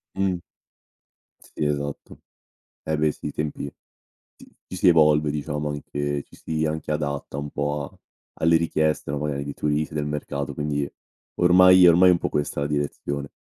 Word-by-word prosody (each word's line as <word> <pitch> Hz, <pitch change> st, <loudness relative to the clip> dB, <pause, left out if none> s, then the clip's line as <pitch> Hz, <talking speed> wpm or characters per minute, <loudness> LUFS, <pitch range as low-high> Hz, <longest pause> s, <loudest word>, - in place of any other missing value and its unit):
Mh. 95 Hz, -2 st, +1 dB, 1.0 s
Sì, -, -, -5 dB
esatto. 70 Hz, -1 st, -4 dB, 0.6 s
Eh 80 Hz, 0 st, -1 dB
beh 75 Hz, 0 st, +2 dB
sì, -, -, -9 dB
i 75 Hz, -, -4 dB
tempi, 75 Hz, -1 st, -4 dB, 0.7 s
si -, -, -16 dB, 0.2 s
ci 95 Hz, -, -7 dB
si 90 Hz, +1 st, +4 dB
evolve 75 Hz, -3 st, +5 dB
diciamo 75 Hz, 0 st, -3 dB
anche, 75 Hz, -1 st, -3 dB
ci -, -, -19 dB
si 80 Hz, -1 st, -2 dB
anche 80 Hz, 0 st, -2 dB
adatta 70 Hz, -2 st, -3 dB
un 75 Hz, 0 st, -4 dB
po' 75 Hz, +1 st, -2 dB
a -, -, -12 dB, 0.4 s
alle 80 Hz, +1 st, +3 dB
richieste, 80 Hz, -3 st, 0 dB
no, 70 Hz, -, -2 dB
magari 70 Hz, -1 st, -2 dB
di 70 Hz, -, -5 dB
turisti, 75 Hz, +1 st, -1 dB
del 75 Hz, -1 st, -2 dB
mercato, 75 Hz, -1 st, -4 dB
quindi 75 Hz, -1 st, -2 dB, 0.5 s
ormai 90 Hz, +1 st, +7 dB
è -, -, +9 dB
ormai 90 Hz, +2 st, +6 dB
un 90 Hz, -, +5 dB
po' -, -, -2 dB
questa 75 Hz, -1 st, -2 dB
la 70 Hz, -, 0 dB
direzione. 70 Hz, -1 st, -3 dB
75 Hz, 170 wpm, -24 LUFS, 70-80 Hz, 1.0 s, è